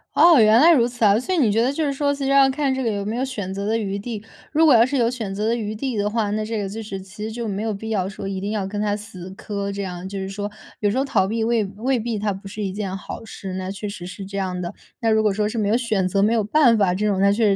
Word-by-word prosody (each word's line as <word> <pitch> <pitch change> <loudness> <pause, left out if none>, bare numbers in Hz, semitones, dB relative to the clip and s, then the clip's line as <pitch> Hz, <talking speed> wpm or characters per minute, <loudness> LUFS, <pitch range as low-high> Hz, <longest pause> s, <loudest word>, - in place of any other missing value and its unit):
哦， 335 -4 +7
原 215 +1 +6
来 325 +5 +7
如 245 -7 +4
此 240 -2 -1
啊。 205 +1 +5
所 255 +10 -2
以 - - +1
你 245 -9 +3
觉 225 +2 +2
得 250 +3 +2
就 310 +2 -1
是 280 - 0
说， 285 +1 +1
其 280 0 -5
实 270 - 0
要 275 -1 +6
看 275 0 0
这 265 0 -2
个 230 - +1
有 200 -1 -3
没 215 +2 -2
有 250 - -1
选 210 -8 -4
择 200 +1 -3
的 225 +1 +1
余 200 -2 -2
地。 215 0 -6 0.3
如 315 +1 +4
果 300 - +7
要 230 -1 +7
是 275 +2 -1
有 235 -2 +3
选 220 -6 -4
择 210 +2 -1
的 230 - +2
余 215 -2 -3
地 255 +2 -3
的 205 0 +1
话， 215 -2 -1
那 215 +1 -1
这 225 +1 -3
个 200 - -2
就 215 +3 -6
是 200 -3 -6
其 195 +2 -9
实 220 - -3
就 235 0 -4
没 200 -1 -3
有 220 0 -1
必 220 +3 -6
要 195 -4 0
说 195 - -7
一 195 -1 -3
定 200 +2 -3
要 210 -3 -1
跟 205 +2 -3
他 205 -1 +1
死 195 -4 -9
磕 200 +1 -4
这 200 0 -4
样。 180 -1 -6
就 200 - -5
是 190 - -4
说， 205 +1 -4 0.3
有 205 - +2
时 215 - -1
候 270 - +1
逃 190 -8 +2
避 225 +2 -1
未 230 -1 +2
未 235 +6 -1
必 225 0 -2
它 205 0 -1
不 195 +1 -9
是 210 +2 -5
一 195 - -2
件 195 -2 -3
好 195 - -8
事， 195 -3 -7
那 185 0 -4
确 200 +2 -5
实 195 -3 -7
是 195 +1 -7
这 200 +1 -6
样 185 -2 -2
的。 175 +1 -4 0.3
那 230 - +2
如 220 0 +4
果 215 -1 +2
说 210 +1 0
是 220 - -4
没 205 -1 +1
有 225 - +3
选 215 -6 0
择， 195 +2 +1
没 215 +3 +3
有 225 -3 +2
办 245 +1 +4
法、 185 -3 +2
这 210 - -1
种 200 -2 +1
那 200 +1 +4
确 205 -2 +3
210 Hz, 355 characters per minute, -22 LUFS, 195-235 Hz, 0.3 s, 哦